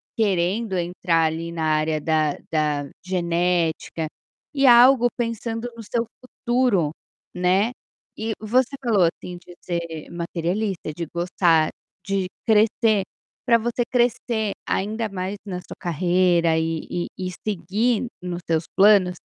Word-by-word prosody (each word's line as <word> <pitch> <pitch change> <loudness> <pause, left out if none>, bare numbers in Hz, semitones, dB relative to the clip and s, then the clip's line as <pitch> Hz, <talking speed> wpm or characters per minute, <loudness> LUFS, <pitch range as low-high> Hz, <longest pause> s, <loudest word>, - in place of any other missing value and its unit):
querendo 195 0 0
entrar 170 -1 +1
ali 165 +1 -2
na 165 -1 -3
área 155 0 +1
da 155 -1 +1 0.2
da 150 -3 0 0.2
genética, 170 -3 0 0.5
e 275 -1 +2
algo 245 0 +7
pensando 230 0 -3
no 230 - -9
seu 230 +2 -1 0.2
futuro, 240 -10 0 0.4
né. 185 +6 +2 0.5
E 220 +1 -2
você 250 +5 +1
falou 220 -7 +3
assim 175 +1 -2
de 175 0 -14
ser 170 -3 -5
materialista, 170 +1 -3
de 170 0 -3
gostar 170 -2 +2 0.4
de 195 -2 -1 0.2
crescer, 220 -1 +3 0.4
para 235 - +5
você 240 +2 -2
crescer 235 -3 +1
ainda 215 +2 -1
mais 190 +1 -4
na 180 -3 -4
sua - - -11
carreira 175 -1 +2
e 160 0 -2
e 175 - -2
e 185 0 -3 0.2
seguir 215 +5 0 0.2
nos 175 -1 -4
seus 160 0 +2
planos 195 -2 +6
185 Hz, 130 wpm, -23 LUFS, 170-225 Hz, 0.5 s, algo